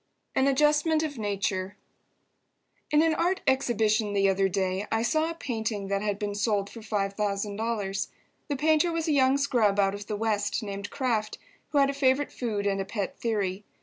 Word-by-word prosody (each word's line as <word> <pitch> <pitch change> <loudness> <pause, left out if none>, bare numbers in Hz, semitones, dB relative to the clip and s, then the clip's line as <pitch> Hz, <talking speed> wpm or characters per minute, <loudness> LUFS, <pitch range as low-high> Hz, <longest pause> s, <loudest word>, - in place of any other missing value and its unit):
AN 265 - +3
ADJUSTMENT 300 +3 +3
OF 290 -5 -4
NATURE 200 -2 -2 1.1
In 300 +1 +4
an 325 -1 +3
art 355 +4 0
exhibition 220 -5 +2
the 195 -1 +3
other 195 0 +2
day 190 +2 -1
I 225 0 +1
saw 315 +5 +1
a 335 - -5
painting 220 -8 -3
that 200 0 0
had 205 -1 -1
been 205 -1 -3
sold 205 -1 0
for 230 - -9
$5,000. 205 0 -2 0.4
The 290 - -1
painter 315 +4 +3
was 330 0 -2
a - - +2
young 265 -1 +4
scrub 235 -8 +2
out 195 -1 +3
of 205 0 -7
the 210 - -3
West 215 0 0
named 200 0 -5
Kraft, 230 -6 -1 0.3
who 295 - -1
had 275 0 +4
a - - -7
favourite 275 0 +2
food 215 -5 -3
and 195 -1 +1
a - - -3
pet 200 -1 -4
theory. 205 -4 -1
215 Hz, 180 wpm, -27 LUFS, 200-275 Hz, 1.1 s, In